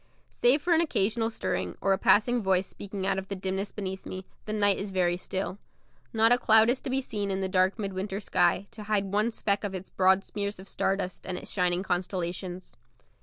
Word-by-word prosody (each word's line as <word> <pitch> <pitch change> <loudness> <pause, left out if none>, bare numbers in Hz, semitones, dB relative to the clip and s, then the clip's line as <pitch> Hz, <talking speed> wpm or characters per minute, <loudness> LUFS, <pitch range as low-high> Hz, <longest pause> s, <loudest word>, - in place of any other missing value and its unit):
Save 275 +5 +3
for 350 - +3
an 330 - +4
occasional 225 -6 +1
stirring, 225 - -3
or 195 - +2
a - - +1
passing 240 +5 +4
voice 190 -1 +2
speaking 195 0 -6
out 195 0 +1
of 195 - -8
the 200 - -4
dimness 190 +1 -3
beneath 190 -2 -5
me, 185 0 -7 0.2
the 215 - -4
night 205 -2 +3
is 200 - -4
very 180 -2 +1
still. 190 +2 -4 0.5
Not 225 0 +4
a 245 - +5
cloud 220 +1 +5
is 255 - -2
to - - -5
be 265 +1 +1
seen 205 -5 -3
in 195 0 -1
the 190 - 0
dark 185 +2 +2
midwinter 195 -1 -3
sky 180 -1 +2
to 220 -2 -9
hide 200 -2 0
one 210 +3 +2
speck 205 -3 -1
of 200 -2 -3
its 185 0 -7
broad 190 +1 +4
smears 200 -1 -4
of 190 - -11
star 195 - 0
dust 185 -2 -5
and 185 -1 -2
its - - -7
shining 180 -1 +1
constellations. 180 0 -3
195 Hz, 220 wpm, -28 LUFS, 190-215 Hz, 0.5 s, a